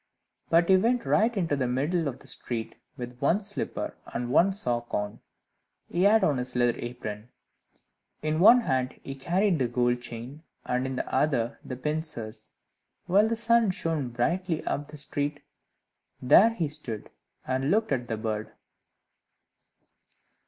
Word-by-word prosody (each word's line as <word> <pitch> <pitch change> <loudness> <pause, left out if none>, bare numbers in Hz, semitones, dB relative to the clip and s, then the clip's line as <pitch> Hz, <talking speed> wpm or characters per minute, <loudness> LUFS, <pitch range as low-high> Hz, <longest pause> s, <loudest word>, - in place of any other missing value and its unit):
But 170 +1 +4
he 190 - +6
went 235 +5 +1
right 225 +1 +2
into 165 -6 +1
the 130 -3 0
middle 150 +7 0
of 130 -2 -4
the - - -17
street, 115 -2 -4 0.2
with 125 0 -7
one 170 +10 +2
slipper 205 0 -4
and 120 0 -4
one 175 +8 +5
sock 120 - -2
on; 105 0 -3 0.7
he 175 - -1
had 215 +1 +5
on 150 -7 +2
his 125 0 -3
leather 120 -1 +3
apron; 120 -2 -6 0.9
in 155 +1 0
one 230 +7 +8
hand 130 - -1
he 135 - -5
carried 175 +6 +1
the 125 - +2
gold 120 0 +1
chain, 120 +5 -8 0.2
and 125 +1 0
in 130 - -4
the - - -4
other 130 -5 +1
the 130 - -6
pincers, 150 -6 -4 0.5
while 200 +4 +4
the 230 - 0
sun 230 -1 +3
shone 165 -8 -1
brightly 165 +8 -1
up 145 0 -2
the 150 0 -10
street. 145 +1 -3 0.8
There 190 - +6
he 200 -9 -2
stood, 135 -8 -6 0.3
and 130 +2 -1
looked 215 +1 +2
at 125 -3 -1
the 115 -2 -2
bird. 110 -1 -3
145 Hz, 155 wpm, -27 LUFS, 120-180 Hz, 0.9 s, one